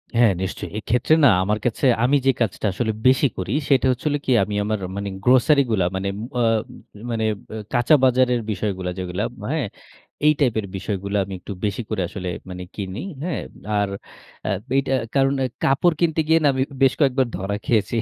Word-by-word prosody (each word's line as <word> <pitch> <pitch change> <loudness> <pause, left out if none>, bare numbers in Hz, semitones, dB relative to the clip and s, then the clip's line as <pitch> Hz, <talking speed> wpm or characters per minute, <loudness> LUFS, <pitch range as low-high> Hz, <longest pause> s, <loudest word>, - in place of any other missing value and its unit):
হ্যাঁ, 115 -2 +5
নিশ্চয়ই। 95 0 -4
এক্ষেত্রে 125 +7 +1
না - - +9 0.2
আমার 105 +3 0
কাছে 120 +3 0 0.2
আমি 130 +4 +4
যে 135 - +6
কাজটা 110 -1 -1
আসলে 110 +3 -1 0.2
বেশি 130 +2 +5
করি, 95 +2 -3 0.2
সেটা 135 -2 +4
হচ্ছে 125 +3 -4
হলো 145 0 0
কি, - - 0
আমি 105 +1 -4
আমার 110 0 -1 0.2
মানে 100 0 -3
গ্রোসারি 130 +4 +5
গুলা 95 -5 +2
মানে 95 +1 -2 0.3
অ - - +2 0.7
মানে 110 -1 0 0.2
ব্যা 110 - -6 0.2
কাঁচা 120 +4 +5
বাজারের 125 -1 +3
বিষয়গুলা 95 -2 -2
যেগুলা, 90 +2 -3 0.3
হ্যাঁ, 155 -5 0 0.6
এই 150 - +6
টাইপের 115 -7 +1
বিষয়গুলা 100 +1 -3
আমি 95 - -8
একটু 100 - -9
বেশি 100 +3 -1
করে 105 -4 -1
আসলে 90 0 -6 0.2
মানে 90 0 -6
কিনি, 95 0 -5 0.2
হ্যাঁ। 175 -1 -2 0.4
আর 100 -1 +1 0.6
আ - - 0 0.3
এইটা 135 -1 0 0.2
কারণ 135 0 +3 0.3
কাপড় 150 +5 +3
কিনতে 165 -2 +1
গিয়ে 160 +1 +5
না, 145 - +5
আমি 130 0 +1 0.2
বেশ 135 - +5
কয়েকবার 135 -3 +3
ধরা 95 +2 -3
খেয়েছি। 110 0 +1
115 Hz, 180 wpm, -22 LUFS, 100-135 Hz, 0.7 s, না